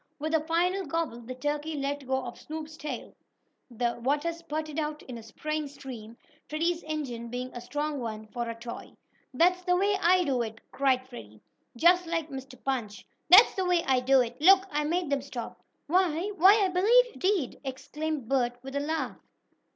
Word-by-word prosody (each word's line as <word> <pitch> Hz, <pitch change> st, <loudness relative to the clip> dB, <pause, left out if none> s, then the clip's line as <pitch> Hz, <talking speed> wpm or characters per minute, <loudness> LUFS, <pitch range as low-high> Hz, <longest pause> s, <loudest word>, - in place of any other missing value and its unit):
With 310 Hz, +2 st, -3 dB
a 320 Hz, -, +5 dB
final 345 Hz, +5 st, 0 dB
gobble, 305 Hz, -6 st, -2 dB
the 250 Hz, +2 st, -7 dB
turkey 295 Hz, +3 st, -2 dB
let 280 Hz, -1 st, -3 dB
go 265 Hz, -1 st, 0 dB
of 240 Hz, -, -8 dB
Snoop's 310 Hz, 0 st, -7 dB
tail. 295 Hz, -6 st, -6 dB, 0.6 s
The 240 Hz, 0 st, -2 dB
water 290 Hz, +6 st, 0 dB
spurted 310 Hz, -2 st, -4 dB
out 300 Hz, 0 st, -3 dB
in 250 Hz, -, -8 dB
a -, -, -10 dB
spraying 305 Hz, +7 st, -4 dB
stream, 235 Hz, -5 st, -10 dB, 0.3 s
Freddie's 335 Hz, +3 st, 0 dB
engine 265 Hz, -7 st, -4 dB
being 250 Hz, +1 st, -4 dB
a 240 Hz, -, -6 dB
strong 290 Hz, +4 st, -3 dB
one, 220 Hz, -3 st, -5 dB
for 240 Hz, 0 st, -4 dB
a 230 Hz, -, -4 dB
toy. 235 Hz, +1 st, -8 dB, 0.4 s
"That's 355 Hz, +7 st, +3 dB
the 360 Hz, 0 st, +2 dB
way 400 Hz, +2 st, +2 dB
I 360 Hz, +1 st, +5 dB
do 265 Hz, -6 st, 0 dB
it!" 225 Hz, -1 st, -5 dB
cried 260 Hz, -2 st, +1 dB
Freddie, 110 Hz, -, -11 dB, 0.4 s
just 350 Hz, +5 st, +5 dB
like 330 Hz, -2 st, -2 dB
Mr. 265 Hz, -1 st, -8 dB
Punch. 230 Hz, -7 st, -3 dB, 0.2 s
"That's 385 Hz, +7 st, +9 dB
the 380 Hz, -, -1 dB
way 355 Hz, -2 st, +2 dB
I 260 Hz, -1 st, +3 dB
do 260 Hz, +1 st, +4 dB
it! 245 Hz, +2 st, -4 dB
Look, 380 Hz, +3 st, +7 dB
I 300 Hz, 0 st, 0 dB
made 340 Hz, -1 st, -1 dB
them 280 Hz, -1 st, +1 dB
stop!" 255 Hz, -3 st, -7 dB, 0.3 s
"Why 355 Hz, +3 st, +1 dB
why, 400 Hz, +4 st, +6 dB
I -, -, +1 dB
believe 430 Hz, +8 st, +5 dB
you -, -, -13 dB
did!" 370 Hz, -8 st, 0 dB
exclaimed 285 Hz, +1 st, -4 dB
Bert, 245 Hz, -2 st, +1 dB
with 270 Hz, +1 st, -7 dB
a -, -, +1 dB
laugh. 315 Hz, +3 st, -3 dB
295 Hz, 190 wpm, -28 LUFS, 255-335 Hz, 0.6 s, That's